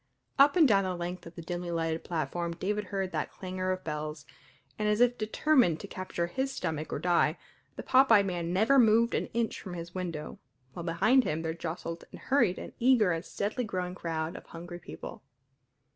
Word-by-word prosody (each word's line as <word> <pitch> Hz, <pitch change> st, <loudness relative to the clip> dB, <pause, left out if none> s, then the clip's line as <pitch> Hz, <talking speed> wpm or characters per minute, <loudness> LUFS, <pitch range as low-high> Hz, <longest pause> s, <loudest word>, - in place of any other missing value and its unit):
Up 285 Hz, +3 st, +7 dB
and 330 Hz, -5 st, +7 dB
down 200 Hz, -4 st, +4 dB
the 185 Hz, -1 st, -2 dB
length 175 Hz, 0 st, -5 dB
of 165 Hz, -, -12 dB
the 170 Hz, -, -8 dB
dimly 175 Hz, +1 st, -4 dB
lighted 165 Hz, -1 st, -1 dB
platform 170 Hz, +1 st, -2 dB
David 210 Hz, +4 st, -2 dB
heard 195 Hz, -1 st, -3 dB
that -, -, -2 dB
clangor 185 Hz, 0 st, -3 dB
of 185 Hz, 0 st, -3 dB
bells, 150 Hz, -1 st, -4 dB, 0.5 s
and 210 Hz, 0 st, +1 dB
as 210 Hz, +1 st, +2 dB
if 245 Hz, 0 st, +4 dB
determined 220 Hz, -, +2 dB
to -, -, -7 dB
capture 185 Hz, -2 st, -3 dB
his 265 Hz, +10 st, -2 dB
stomach 155 Hz, -, -3 dB
or -, -, -1 dB
die, 170 Hz, -2 st, +2 dB, 0.4 s
the -, -, -6 dB
pop 265 Hz, -1 st, +5 dB
eyed 205 Hz, -3 st, +7 dB
man 175 Hz, -3 st, -2 dB
never 220 Hz, +9 st, +4 dB
moved 230 Hz, 0 st, +5 dB
an -, -, 0 dB
inch 230 Hz, -1 st, -2 dB
from 185 Hz, -3 st, -7 dB
his 170 Hz, 0 st, -7 dB
window, 170 Hz, -5 st, -5 dB, 0.3 s
while -, -, -6 dB
behind 200 Hz, +10 st, +4 dB
him 160 Hz, -4 st, -2 dB
there 160 Hz, 0 st, -1 dB
jostled 170 Hz, 0 st, -5 dB
and -, -, -10 dB
hurried 235 Hz, -10 st, +2 dB
an -, -, -8 dB
eager 235 Hz, -6 st, +4 dB
and 165 Hz, 0 st, -2 dB
steadily 215 Hz, +5 st, -2 dB
growing 180 Hz, -4 st, -3 dB
crowd 165 Hz, -2 st, -3 dB
of -, -, -10 dB
hungry 175 Hz, +1 st, -8 dB
people. 175 Hz, -, -9 dB
180 Hz, 200 wpm, -30 LUFS, 170-215 Hz, 0.5 s, Up